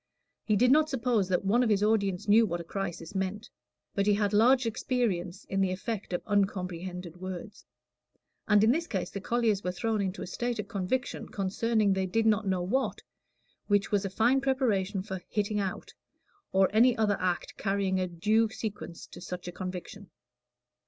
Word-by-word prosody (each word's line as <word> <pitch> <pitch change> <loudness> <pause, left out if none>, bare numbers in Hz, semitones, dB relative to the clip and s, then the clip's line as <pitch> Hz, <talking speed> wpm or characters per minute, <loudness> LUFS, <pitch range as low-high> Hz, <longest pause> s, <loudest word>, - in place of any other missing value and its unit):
He 215 - +1
did 245 +5 +4
not 310 +2 +5
suppose 235 -7 0
that 185 +1 0
one 225 +6 +3
of 245 - +2
his 205 -1 +2
audience 200 -4 +1
knew 220 +2 +6
what 175 -2 -3
a - - -5
crisis 175 -1 -5
meant; 195 +2 -3 0.4
but 200 -1 0
he 205 - +5
had 205 0 0
large 245 +4 +5
experience 210 -6 -1
in 195 0 -1
the 190 -1 +2
effect 195 +2 -4
of 175 - -2
uncomprehended 180 -3 -2
words; 185 +2 -8 0.8
and 210 -1 +5
in 220 - +5
this 330 +5 0
case 190 -5 -3
the 200 - -5
colliers 225 -3 +1
were 180 - -1
thrown 215 +4 -1
into 190 +1 -3
a - - -5
state 240 +5 -3
of 210 -2 -4
conviction 200 +7 -2
concerning 205 +1 +1
they 190 0 0
did 225 +4 +1
not 215 -1 +2
know 185 -2 0
what, 260 +9 -1 0.6
which 205 -1 +2
was 205 -1 +2
a 195 - -2
fine 235 +7 +2
preparation 215 -8 0
for 190 -3 -5
"hitting 210 0 -1
out," 195 -2 -4 0.6
or 190 0 +4
any 240 +3 +5
other 210 -3 +2
act 180 -1 -2
carrying 195 -2 0
a 185 - 0
due 215 +6 +2
sequence 215 -6 -6
to - - -12
such 180 0 -6
a - - -4
conviction. 185 +2 -7
200 Hz, 185 wpm, -29 LUFS, 185-225 Hz, 0.8 s, knew